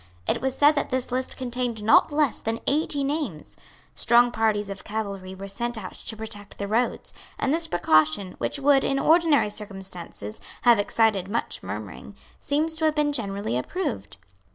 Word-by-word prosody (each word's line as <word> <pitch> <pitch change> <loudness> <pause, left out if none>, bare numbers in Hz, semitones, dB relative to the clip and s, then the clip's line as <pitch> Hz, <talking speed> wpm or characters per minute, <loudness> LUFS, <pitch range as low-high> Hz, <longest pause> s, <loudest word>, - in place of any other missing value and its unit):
It - - 0
was 265 0 -1
said 290 +1 +7
that 295 -2 -2
this 255 -1 -2
list 255 +1 -2
contained 245 -3 -3
not 220 - +5
less 295 -3 +1
than 225 +1 -2
eighty 290 -1 +1
names. 275 - -3 0.4
Strong 240 +1 +4
parties 215 -2 +1
of 195 -1 -7
cavalry 200 -3 -5
were 195 +1 -7
sent 235 +4 -2
out 190 -4 -7
to 220 - -5
protect 210 -2 -7
the 200 - -3
roads; 230 +4 -1 0.2
and 275 - 0
this 325 0 +1
precaution, 175 +2 +2
which - - -1
would, 280 -1 +4
in 275 - +1
ordinary 315 -6 +4
circumstances, 190 - -8 0.2
have 235 -3 +6
excited 205 -2 +2
much 230 +3 -2
murmuring, 105 - -7 0.2
seems 310 +3 0
to 320 - +1
have 310 -1 +2
been 295 -1 +1
generally 200 - -2
approved. 125 - -3
225 Hz, 170 wpm, -25 LUFS, 195-275 Hz, 0.4 s, said